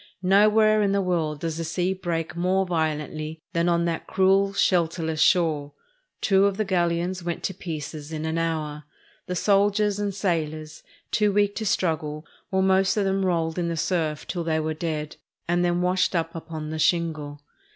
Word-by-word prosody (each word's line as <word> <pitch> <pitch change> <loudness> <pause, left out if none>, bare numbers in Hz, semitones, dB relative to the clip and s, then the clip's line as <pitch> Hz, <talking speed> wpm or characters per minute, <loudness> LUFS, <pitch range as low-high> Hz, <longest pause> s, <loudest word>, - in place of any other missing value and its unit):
Nowhere 215 +3 +5
in 200 -1 +2
the 200 - +2
world 160 -5 -1
does 165 -1 -3
the 165 - -2
sea 175 +3 -1
break 170 -4 -3
more 185 +2 +1
violently 155 -2 -3
than 170 +1 +2
on 170 0 +2
that 165 -1 -3
cruel, 195 -1 +3
shelterless 165 -4 +1
shore. 155 -5 +2 0.5
Two 195 -1 +4
of 195 -1 -2
the 215 - 0
galleons 175 0 0
went 170 -1 -4
to 190 - -2
pieces 155 -4 -6
in 155 0 -4
an 160 +1 -1
hour. 155 -3 -3 0.4
The 180 - -3
soldiers 205 +1 +2
and 205 -1 -1
sailors, 155 -5 -3 0.3
too 210 -1 +2
weak 205 0 +2
to 220 - -2
struggle, 155 -5 -1 0.2
were 190 0 +1
most 190 +1 +3
of 205 - +2
them 195 0 +1
rolled 165 -2 0
in 170 - 0
the 170 -1 -2
surf 155 -3 -1
till 175 -2 -3
they 160 -1 0
were 155 0 -1
dead, 155 -2 -4 0.3
and 175 +1 +1
then 175 0 +1
washed 180 +1 +1
up 165 -1 -1
upon 160 -2 -6
the 160 - -4
shingle. 155 -4 0
170 Hz, 180 wpm, -25 LUFS, 160-190 Hz, 0.5 s, Nowhere